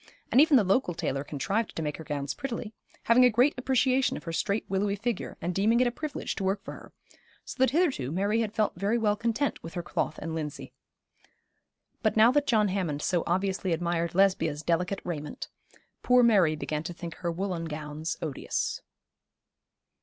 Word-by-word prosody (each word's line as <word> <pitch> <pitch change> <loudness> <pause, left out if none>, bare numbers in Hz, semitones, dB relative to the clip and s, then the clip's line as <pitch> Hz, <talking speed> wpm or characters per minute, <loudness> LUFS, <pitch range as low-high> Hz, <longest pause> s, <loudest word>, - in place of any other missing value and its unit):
And 260 - +7
even 305 -3 +6
the 225 - +4
local 190 -2 +1
tailor 135 -4 -2
contrived 195 +11 -2
to 160 - -3
make 150 -1 -3
her 160 - -8
gowns 145 -2 -3
prettily, 230 -4 -5 0.3
having 235 +2 +5
a 250 - +7
great 245 +6 +3
appreciation 260 0 +1
of - - -10
her 165 - -5
straight 200 +5 -1
willowy 200 +1 0
figure, 225 +1 -3
and 175 +2 -2
deeming 215 +6 +3
it 250 - +4
a 240 - +1
privilege 295 +3 -4
to - - -3
work 195 +1 0
for - - -7
her, - - -12 0.5
so - - -8
that 260 - +5
hitherto 275 - +1
Mary 200 +6 +1
had 215 -2 -2
felt 215 -1 0
very 200 +6 0
well 210 -3 +2
content 230 +6 -1
with 165 - -9
her 175 - -3
cloth 160 - -2
and 160 +1 -5
linsey. 150 -3 -5 1.3
But 220 -2 +1
now 225 +3 +7
that 290 +1 +1
John 215 -4 +3
Hammond 170 -7 -2
so 175 -3 +1
obviously 190 0 0
admired 170 0 -1
Lesbia's 165 -6 +2
delicate 180 +4 0
raiment, 150 -4 -5 0.5
poor 250 0 +5
Mary 195 -9 +4
began 150 0 -3
to 175 +2 -6
think 170 -1 -7
her 170 -1 -2
woollen 175 -1 -3
gowns 150 +1 -5
odious. 150 -4 -2
195 Hz, 190 wpm, -28 LUFS, 165-230 Hz, 1.3 s, And